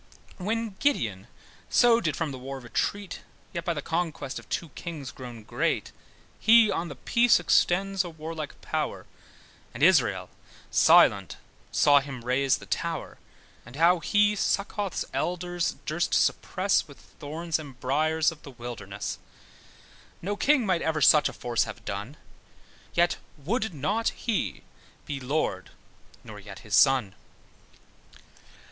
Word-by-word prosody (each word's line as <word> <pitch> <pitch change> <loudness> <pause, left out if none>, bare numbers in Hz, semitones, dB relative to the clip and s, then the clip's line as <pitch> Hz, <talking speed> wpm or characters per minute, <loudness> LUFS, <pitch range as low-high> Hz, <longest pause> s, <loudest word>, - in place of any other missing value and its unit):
When 225 +4 -1
Gideon 110 - 0 0.4
so 235 -1 +5
did 155 -4 -1
from 160 -3 -2
the 130 - -7
war 135 +1 -6
retreat, 190 +10 -3 0.3
Yet 170 - -3
by 170 -1 -1
the 145 - -4
conquest 165 -5 -3
of - - -17
two 170 - -3
kings 150 -4 -7
grown 120 -4 -9
great, - - -1 0.5
He 225 -1 +6
on 170 - -2
the 150 - -8
peace 235 -3 +3
extends 190 +3 +2
a 175 - -6
warlike 160 -1 -7
power, - - -3 0.7
And - - -3
Israel - - +3 0.4
silent - - +5 0.3
saw 145 -1 +5
him 135 -4 -8
raze 130 +2 +2
the - - -12
tower; - - -3 0.4
And 120 +2 -13
how 170 +3 +4
he 205 +4 +3
Succorth's 200 -1 -1
Elders 175 0 -1
durst - - 0
suppress, - - +1
With - - -14
thorns 160 +3 -4
and 140 -5 -10
briars 155 +5 +1
of 160 - -13
the - - -11
wilderness. 115 -5 -6 1.0
No 205 +4 -3
king 270 +2 +3
might 185 -4 +1
ever 160 -1 -1
such 150 +2 +6
a - - -9
force 120 -1 0
have 110 -2 -9
done; 105 +9 -5 0.8
Yet 175 0 +3 0.2
would 215 - -1
not 200 +10 0
he 230 -4 -3 0.4
be 145 -3 -4
Lord, 140 +5 -2 0.5
nor - - -10
yet - - -11
his - - -8
son. 130 -8 +4
160 Hz, 140 wpm, -27 LUFS, 135-190 Hz, 1.0 s, He